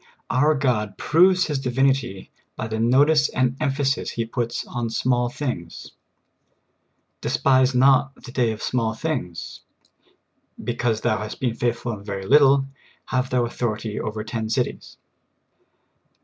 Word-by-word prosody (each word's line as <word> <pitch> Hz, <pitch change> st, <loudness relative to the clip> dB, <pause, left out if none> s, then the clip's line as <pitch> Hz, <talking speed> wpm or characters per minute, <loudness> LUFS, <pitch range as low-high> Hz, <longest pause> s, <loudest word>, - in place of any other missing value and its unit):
Our 150 Hz, +4 st, +3 dB
God 115 Hz, -7 st, -1 dB
proves 180 Hz, +3 st, +4 dB
His 145 Hz, -3 st, -2 dB
Divinity 130 Hz, -5 st, 0 dB, 0.3 s
bj^ 110 Hz, +1 st, -4 dB
the 110 Hz, -, -2 dB
notice 145 Hz, +6 st, +4 dB
and 130 Hz, 0 st, 0 dB
em 150 Hz, -, +2 dB
phasis 135 Hz, 0 st, -1 dB
He 115 Hz, -, -3 dB
puts 120 Hz, 0 st, -3 dB
on 120 Hz, -2 st, -3 dB
small 120 Hz, +1 st, +1 dB
things. 120 Hz, -, -5 dB, 0.5 s
* -, -, -47 dB
' -, -, -48 dB
Despise 130 Hz, -1 st, +2 dB
not 135 Hz, +1 st, +4 dB
the 125 Hz, -, -12 dB
day 120 Hz, -3 st, +1 dB
of 110 Hz, -, -7 dB
small 115 Hz, -3 st, -1 dB
things. 115 Hz, -, -4 dB, 0.3 s
" -, -, -39 dB
" -, -, -17 dB
Because 120 Hz, -2 st, 0 dB
thou 110 Hz, -4 st, +1 dB
hast 105 Hz, 0 st, -6 dB
been 125 Hz, -3 st, 0 dB
faith 120 Hz, 0 st, 0 dB
ful 120 Hz, -, -3 dB
in 105 Hz, -, -7 dB
a -, -, -14 dB
very 100 Hz, -2 st, -5 dB
little, 140 Hz, +2 st, +5 dB, 0.4 s
have 125 Hz, 0 st, 0 dB
thou 125 Hz, -2 st, +1 dB
authority 110 Hz, -2 st, -3 dB
over 110 Hz, 0 st, -4 dB
ten 110 Hz, 0 st, -4 dB
cities." 110 Hz, -, -3 dB
125 Hz, 160 wpm, -23 LUFS, 110-135 Hz, 0.5 s, little